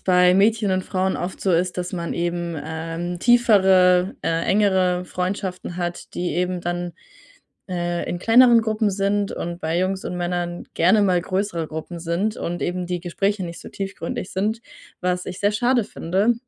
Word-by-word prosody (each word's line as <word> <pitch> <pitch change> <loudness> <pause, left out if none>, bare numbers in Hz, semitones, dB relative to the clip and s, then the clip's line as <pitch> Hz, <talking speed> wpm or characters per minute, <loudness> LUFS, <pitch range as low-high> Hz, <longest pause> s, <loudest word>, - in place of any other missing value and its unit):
bei 180 -1 +4
Mädchen 210 +1 +3
und 185 0 0
Frauen 190 -1 -1
oft 180 +2 -5
so 190 - +1
ist, 180 +2 +1
dass 180 +1 -3
man 170 -2 -3
eben, 170 -1 -2
ähm, 165 +2 -4
tiefere, 190 -5 +4
äh, 165 0 0
engere 185 -3 +2
Freundschaften 180 -1 -4
hat, 175 -1 -5
die 175 0 -2
eben 180 0 -1
dann, 175 0 -3 0.8
äh, 175 -1 -2
in 175 - -3
kleineren 235 +3 +6
Gruppen 215 -1 0
sind 200 +1 0
und 170 +1 -5
bei 160 0 -1
Jungs 190 +1 -1
und 180 - -3
Männern 175 0 -3
gerne 190 +6 +4
mal 185 -3 +3
größere 185 -4 -2
Gruppen 160 +2 -6
sind 175 +6 -1
und 175 +1 -4
eben 180 0 -2
die 175 0 -3
Gespräche 195 +2 -1
nicht 170 -1 -7
so - - -10
tiefgründig 195 -2 -5
sind, 215 +4 -1 0.4
was 180 0 -1
ich 185 - -6
sehr 205 +1 +2
schade 240 +2 +2
finde. 195 +7 0
180 Hz, 170 wpm, -22 LUFS, 175-200 Hz, 0.8 s, kleineren